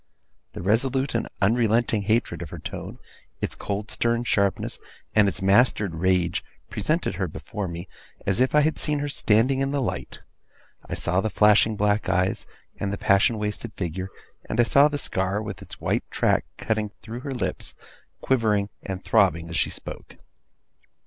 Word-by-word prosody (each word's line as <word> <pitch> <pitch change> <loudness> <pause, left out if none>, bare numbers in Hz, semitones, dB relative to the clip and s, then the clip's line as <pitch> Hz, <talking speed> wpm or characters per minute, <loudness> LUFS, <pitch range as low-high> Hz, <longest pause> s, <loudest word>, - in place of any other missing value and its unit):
The - - -6
resolute 130 +7 +1
and 115 - 0 0.2
unrelenting 115 0 +3
hatred 110 +4 0
of - - -6
her - - -7
tone, - - -7 0.4
its - - -2
cold 100 +1 -4
stern 120 0 +1
sharpness, 100 -4 0 0.3
and 105 -2 +5
its 95 - -2
mastered 100 -1 +4
rage, 90 0 +1 0.3
presented - - 0
her - - +1
before 105 -2 -5
me, 85 +1 -6 0.4
as 100 +3 +1
if 130 +3 +3
I 150 - +7
had 155 +2 +1
seen 150 -1 0
her 145 0 -2
standing 130 0 +2
in 135 0 +1
the 140 0 0
light. 130 - -3 0.7
I - - -2
saw 90 +2 +1
the 110 - -1
flashing 105 +1 +5
black 105 +1 +1
eyes, 90 +1 +1 0.3
and 100 - -1
the 100 - -3
passion 110 +1 +3
wasted 105 +1 -4
figure; 95 0 -4 0.4
and 115 - -2
I - - +7
saw 140 +5 +6
the 145 -1 -2
scar, 95 -5 -1
with 100 -5 -6
its - - -8
white - - -1
track - - +2
cutting 110 -1 -1
through 115 +1 -6
her 135 +2 -5
lips, 125 - -3 0.5
quivering 105 -6 +2
and 95 0 -5
throbbing 85 -6 +3
as - - -4
she - - +2
spoke. - - -8
105 Hz, 170 wpm, -25 LUFS, 95-120 Hz, 0.7 s, I